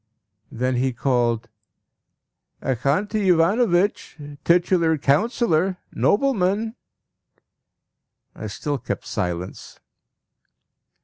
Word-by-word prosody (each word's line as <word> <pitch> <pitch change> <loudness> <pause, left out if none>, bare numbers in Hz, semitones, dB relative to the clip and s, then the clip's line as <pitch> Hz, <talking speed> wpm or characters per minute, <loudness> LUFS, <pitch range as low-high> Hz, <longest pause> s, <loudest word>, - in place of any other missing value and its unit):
Then 125 +1 -1
he 130 +1 0
called 120 -2 0 1.1
"Axanti 185 - 0
Ivanovitch! 180 +2 +2 0.3
Titular 170 -2 +3
Councillor! 180 - +1 0.2
Nobleman!" 220 -2 +1 1.6
I - - -7
still 145 -3 -3
kept - - -5
silence. 90 0 -4
165 Hz, 65 wpm, -23 LUFS, 130-200 Hz, 1.6 s, Titular